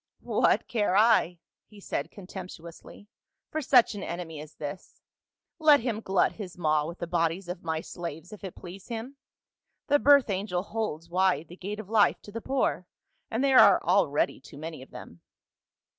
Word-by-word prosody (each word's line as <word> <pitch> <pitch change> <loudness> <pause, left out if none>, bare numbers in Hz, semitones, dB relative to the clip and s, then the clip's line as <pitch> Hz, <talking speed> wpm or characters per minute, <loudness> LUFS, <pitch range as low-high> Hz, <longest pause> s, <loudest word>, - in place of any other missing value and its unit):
"'What - - +2
care 205 -5 +1
I,' 215 -5 +4 0.3
he 210 -1 -16
said 150 -6 -4
contemptuously, 180 -1 -11 0.4
'for 310 - -2
such 255 -5 +5
an 205 - -6
enemy 170 -4 -6
as 155 0 -12
this? 145 +4 -8 0.6
Let 300 -4 +6
him 225 -3 -2
glut 190 -3 +2
his 185 -5 -9
maw 155 -3 +1
with 170 +2 -7
the - - -4
bodies 170 +2 -1
of 180 0 -6
my 160 -1 -2
slaves 170 +2 -7
if 210 - -12
it 190 - -7
please 185 +2 -11
him; 235 +4 -6 0.7
the 290 +1 +5
birth 280 -6 +5
angel 185 -2 -2
holds 205 -7 -4
wide 180 -3 +1
the 175 - -10
gate 200 +3 -6
of 215 - -8
life 215 -1 +3
to 205 - -11
the 230 +2 -6
poor, 260 -9 -1 0.4
and 230 +4 -1
there 270 -2 +6
are - - +7
already - - +2
too 145 - -14
many 155 -1 -7
of 130 - -13
them.' 85 - -12
185 Hz, 175 wpm, -28 LUFS, 170-220 Hz, 0.7 s, are